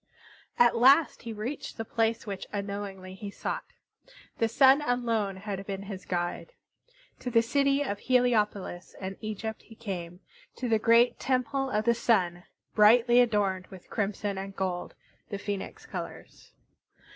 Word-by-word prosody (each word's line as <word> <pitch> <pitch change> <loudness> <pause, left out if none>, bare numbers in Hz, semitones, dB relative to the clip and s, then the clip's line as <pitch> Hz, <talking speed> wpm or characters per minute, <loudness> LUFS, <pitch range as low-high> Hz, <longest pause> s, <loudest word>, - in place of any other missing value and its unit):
At 240 0 +5
last 275 +6 +5
he 230 - -6
reached 225 +7 -5
the 225 - -4
place 225 +1 0
which 200 -3 -5
unknowingly 200 -2 -5
he 200 +2 -7
sought. - - -4 0.7
The 230 - +3
Sun 265 +5 +5
alone 230 -7 0
had 195 0 -5
been 195 -1 -4
his 195 -2 -8
guide. 175 - -3 0.7
To 250 - -4
the 230 -1 +4
city 275 +3 +2
of 200 -7 -3
Heliopolis 210 -8 +1
in 190 0 -5
Egypt 215 0 -5
he 225 - -16
came; 180 -6 -6 0.4
to 255 - -3
the 225 -2 +3
great 230 +2 +4
Temple 265 +1 0
of 215 -2 0
the 235 - +5
Sun, 180 -7 +1 0.3
brightly 235 +3 +6
adorned 200 -6 +1
with 185 -2 -14
crimson 205 -1 -2
and 195 0 -7
gold, 185 -2 -3 0.3
the 200 - -3
Phoenix 200 -1 -5
colors. - - -8
215 Hz, 145 wpm, -28 LUFS, 195-240 Hz, 0.7 s, brightly